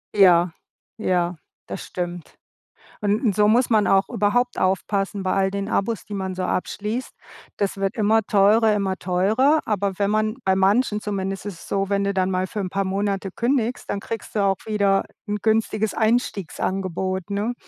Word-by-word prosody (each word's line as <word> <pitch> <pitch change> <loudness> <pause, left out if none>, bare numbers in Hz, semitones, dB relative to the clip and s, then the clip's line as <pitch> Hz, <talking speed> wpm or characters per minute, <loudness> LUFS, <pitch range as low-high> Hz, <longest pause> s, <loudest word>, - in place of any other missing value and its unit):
Ja, 180 -3 +6 0.5
ja, 180 -4 0 0.3
das - - -6
stimmt. 175 -1 -6 0.7
Und 210 +1 +1
so 210 +1 +4
muss 240 +3 +4
man 215 -3 +3
auch 195 0 +3
überhaupt 245 +5 +1
aufpassen 195 +1 0
bei 185 - +1
all 195 0 +2
den 200 0 -3
Abos, 215 +1 -1
die 210 - -8
man 190 -1 -3
so 185 - -2
abschließt. 210 +7 -3 0.4
Das 200 -1 -1
wird 195 +4 -1
immer 220 0 +3
teurer, 215 +1 +4
immer 195 -2 -1
teurer, 215 - +2
aber 200 -3 -1
wenn 200 0 +1
man 215 +1 0
bei 190 - +3
manchen, 210 +3 +2
zumindest 195 -1 -3
ist 205 - -4
es 165 - -13
so, 195 -1 0
wenn 200 0 +1
du 200 0 0
dann 190 0 +1
mal 185 0 0
für 210 - -5
'n 185 -2 -3
paar 195 +1 -1
Monate 195 0 -1
kündigst, 245 0 -1
dann - - -1
kriegst 225 +1 -6
du - - +2
auch 195 -1 +2
wieder 200 -2 +2 0.2
'n 210 0 -2
günstiges 220 -1 +1
Einstiegsangebot, 190 -4 -1
ne? 205 +4 -1
200 Hz, 175 wpm, -23 LUFS, 190-215 Hz, 0.7 s, Ja